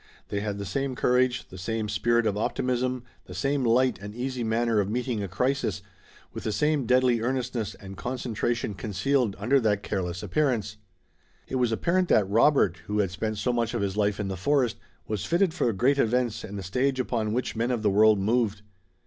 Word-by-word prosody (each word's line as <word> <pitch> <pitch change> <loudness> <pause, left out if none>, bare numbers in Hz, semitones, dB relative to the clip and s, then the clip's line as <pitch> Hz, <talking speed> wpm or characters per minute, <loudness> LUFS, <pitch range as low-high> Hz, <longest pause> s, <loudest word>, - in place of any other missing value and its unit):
They 100 - -1
had 105 -1 -3
the 100 - -5
same 135 +3 -2
courage, 125 0 +1
the 95 - -10
same 110 +3 -2
spirit 120 +3 +1
of 100 - +1
optimism, 125 +3 -1 0.2
the - - -10
same 140 -1 0
light 125 0 +3
and 105 +1 -8
easy 125 0 -3
manner 115 0 +1
of 100 -1 0
meeting 120 -1 -2
a 100 - -3
crisis, 125 0 -1 0.5
with - - -6
the 110 - -1
same 145 +4 +1
deadly 125 -2 +3
earnestness 125 -3 -2
and 95 -1 -10
concentration 120 -1 -2
concealed 105 +4 0
under 120 +7 +3
that 105 -4 +1
careless 90 -3 -3
appearance. 120 -9 0 0.7
It 130 - -2
was 125 -2 +1
apparent 175 +10 +1
that 105 - +3
Robert, 110 - +3
who 105 +1 -1
had 100 -4 +1
spent 110 +3 -3
so 120 +5 0
much 120 0 -1
of 110 - 0
his 100 -1 -2
life 105 0 +1
in 105 - -2
the 95 - -3
forest, 130 +3 +1 0.3
was 105 -3 -3
fitted 175 0 +2
for 145 -8 +1
great 130 +8 +2
events 120 -1 +1
and 100 0 -6
the 100 - -5
stage 130 +8 0
upon 115 -4 -1
which 120 +1 -2
men 115 +2 0
of 120 -3 -1
the 105 - +3
world 105 +1 +5
moved. 105 0 0
115 Hz, 200 wpm, -27 LUFS, 105-125 Hz, 0.7 s, world